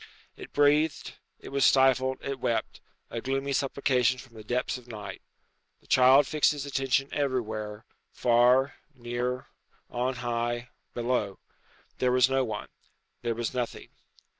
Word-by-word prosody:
It - - -11
breathed, 145 +1 +2 0.3
it - - -10
was 140 0 0
stifled, 130 -1 +4
it 140 -1 -4
wept, 115 -2 -2 0.3
a 115 - -4
gloomy 135 +2 -2
supplication 130 -2 +1
from 125 -1 -13
the 110 -1 -11
depths 125 +4 -1
of 125 - -19
night. 105 -4 -8 0.6
The - - -29
child 130 +3 +6
fixed 150 -1 +2
his 145 -1 -5
attention 135 0 0
everywhere, 110 -6 -2 0.3
far, 125 +3 +3 0.2
near, 125 +1 -3 0.4
on 125 +2 -1
high, 120 0 -2 0.3
below. 120 -5 -1 0.6
There 125 -1 +2
was 125 +1 +4
no 135 0 +2
one. 110 -4 -5 0.5
There 120 -1 -1
was 120 0 -3
nothing. 125 -2 -4
125 Hz, 140 wpm, -28 LUFS, 120-135 Hz, 0.6 s, child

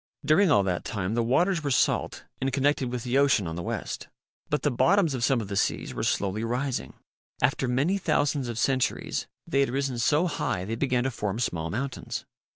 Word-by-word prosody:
During 180 +5 +5
all 100 -9 +5
that 90 -2 -1
time 100 -2 -3
the 120 - +1
waters 165 +9 +2
were 145 - -1
salt 130 - +1 0.2
and 135 +1 0
connected 135 -1 +1
with 125 -2 -3
the 125 +2 +1
ocean 140 -8 +3
on 80 -1 -4
the 85 - -4
west. - - -4 0.4
But 150 - 0
the 145 - +2
bottoms 170 +5 +3
of 125 -3 -2
some 125 -1 +3
of 105 - -6
the 100 - -4
seas - - 0
were - - -4
slowly 100 +2 0
rising. 125 +3 -2 0.4
After 130 +1 +1
many 145 +11 +1
thousands 145 -5 +1
of 120 -2 -4
centuries, 130 0 0 0.2
they 135 - 0
had 140 - +3
risen 135 -1 -1
so 150 +8 +3
high 95 - -2
they 110 - -3
began 125 +1 +1
to 135 - -1
form 105 -3 -3
small 80 -9 -2
mountains. 130 +7 -4
130 Hz, 205 wpm, -27 LUFS, 115-140 Hz, 0.4 s, During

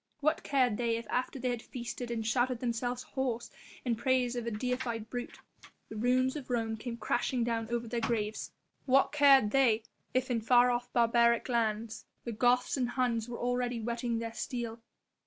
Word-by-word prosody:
What 305 +1 +1
cared 255 -6 +2
they 235 -1 0
if 230 - -6
after 255 +2 -1
they 250 -1 -1
had 240 -2 -3
feasted 240 0 -6
and 225 -2 -2
shouted 245 +1 +1
themselves 245 +1 -2
hoarse 250 -4 -3 0.3
in 240 -2 +1
praise 250 +1 +1
of 240 -1 -3
a - - +2
deified 235 -1 -3
brute, 245 -1 -5 0.5
the 220 - -8
ruins 255 +4 +2
of 285 -4 -7
Rome 225 -2 0
came 235 +1 -6
crashing 240 +2 0
down 230 -1 -1
over 235 0 -2
their 235 +1 -2
graves? 220 -2 -2 0.4
What 270 +1 +4
cared 275 -7 +6
they 240 -5 +3 0.3
if 255 0 0
in 230 -2 +1
far 245 +2 +5
off 245 0 -2
barbaric 235 0 +3
lands 225 -2 -1 0.2
the 235 - -4
Goths 245 +4 +2
and 250 -2 0
Huns 245 -3 0
were 240 - -5
already 245 -1 -1
whetting 235 +1 -2
their 230 0 -4
steel. 230 -1 -4
240 Hz, 180 wpm, -31 LUFS, 230-250 Hz, 0.5 s, cared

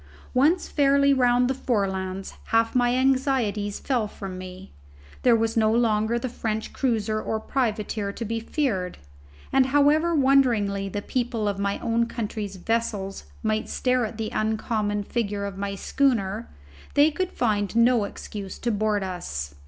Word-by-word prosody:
Once 300 +8 +3
fairly 280 -1 +4
round 245 -1 +3
the 265 - +1
Forelands 195 -7 -2
half 225 0 +2
my 245 -1 +3
anxieties 255 -6 +1
fell 245 -6 0
from 195 -2 -7
me. 185 +1 -9 0.5
There 245 -2 +5
was 225 0 0
no 220 -1 +3
longer 225 0 +2
the 235 - -2
French 220 -3 -3
cruiser 220 -4 0
or 220 - -2
privateer 215 -4 -1
to 230 - -5
be 225 +1 -2
feared, 225 - -2 0.6
and 265 -1 +5
however 295 +5 +3
wonderingly 235 -8 +3
the 205 +1 -4
people 235 -4 -1
of 200 -1 -1
my 200 0 0
own 230 0 +1
country's 210 -3 -4
vessels 200 -1 -2 0.2
might 215 0 0
stare 255 -1 +1
at 220 0 -4
the 220 -1 -3
uncommon 215 -1 -1
figure 205 -2 -2
of 195 -1 -6
my 200 0 -3
schooner, 225 -3 0 0.5
they 290 +2 +6
could 370 +4 -2
find 210 -3 0
no 235 -2 +4
excuse 200 -1 -7
to 240 - -1
board 210 -1 0
us. 75 - -5
220 Hz, 150 wpm, -25 LUFS, 205-250 Hz, 0.6 s, they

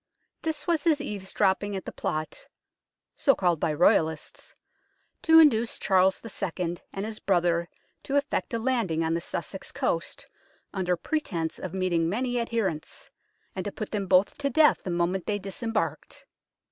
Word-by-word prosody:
This 320 -2 -2
was 335 -4 +1
his 315 -3 +4
eavesdropping 200 -3 -1
at 190 - -5
the - - -5
plot 155 0 -4 0.7
(so 275 - +3
called 175 -4 +1
by 155 - +1
Royalists) 160 0 +1 0.7
to 320 0 +6
induce 240 -8 +5
Charles 190 -1 +3
II. 180 -5 -3
and 195 +1 -4
his 220 0 -6
brother 175 -2 +1 0.3
to 275 - -3
effect 285 0 0
a - - +1
landing 225 -9 0
on 160 0 0
the 170 - -1
Sussex - - -5
coast, - - -2 0.5
under 180 -3 0
pretence 170 - -2
of 185 0 -6
meeting 175 -3 +1
many 245 +5 -1
adherents, 220 -9 -3 0.4
and 190 - -3
to 205 - -4
put 215 - -6
them 200 -3 -2
both 185 +2 +4
to 280 -1 0
death 300 +3 +4
the - - -6
moment 175 +2 0
they 210 - 0
disembarked. 195 -5 -4
195 Hz, 155 wpm, -27 LUFS, 175-235 Hz, 0.7 s, to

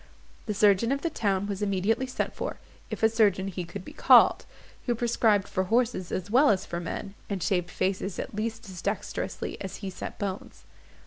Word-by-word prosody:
The 210 - -1
surgeon 205 +3 +4
of 275 0 -1
the 335 - 0
town 200 -7 0
was 200 0 -4
immediately 205 +5 +1
sent 255 - -2
for, - - -4 0.3
if - - -5
a - - +8
surgeon 205 -4 +2
he 180 -1 -4
could 170 +2 -8
be - - -10
called, - - +6 0.4
who 240 - +2
prescribed 225 -4 +2
for 185 - -1
horses 225 -3 +1
as 190 +2 -3
well 275 +5 +6
as 190 -2 +2
for 170 - -4
men, 175 +3 -5 0.2
and 195 -4 -2
shaved 180 -2 0
faces 190 0 -2
at - - -5
least 220 +1 -4
as 185 -3 -8
dexterously 200 +2 -3
as 190 - -5
he 190 - -3
set - - -7
bones. 195 -1 -5
200 Hz, 195 wpm, -27 LUFS, 190-225 Hz, 0.4 s, a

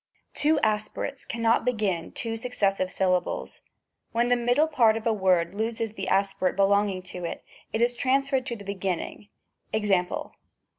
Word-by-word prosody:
Two 300 +1 +3
aspirates 215 +6 -1
cannot 230 0 +1
begin 210 -9 -1
two 225 -1 -3
successive 200 -6 0
sylla 185 -1 +2
bles; - - -6 0.5
when 235 +1 +2
the 245 - +5
middle 245 +5 +3
part 235 -8 +3
of 225 - -7
a 230 - +3
word 185 -4 +2
loses 225 +1 -2
the 195 -3 -5
aspi 195 0 +1
rate 185 - +2
belonging 200 -1 +2
to 180 -1 -8
it, 170 - -5 0.3
it 220 - -1
is 240 +1 +2
transferred 270 +1 +1
to 235 - -2
the 200 -3 -10
beginning; 195 +1 -4 0.4
Ex.? 220 -1 -1
215 Hz, 160 wpm, -26 LUFS, 195-240 Hz, 0.5 s, the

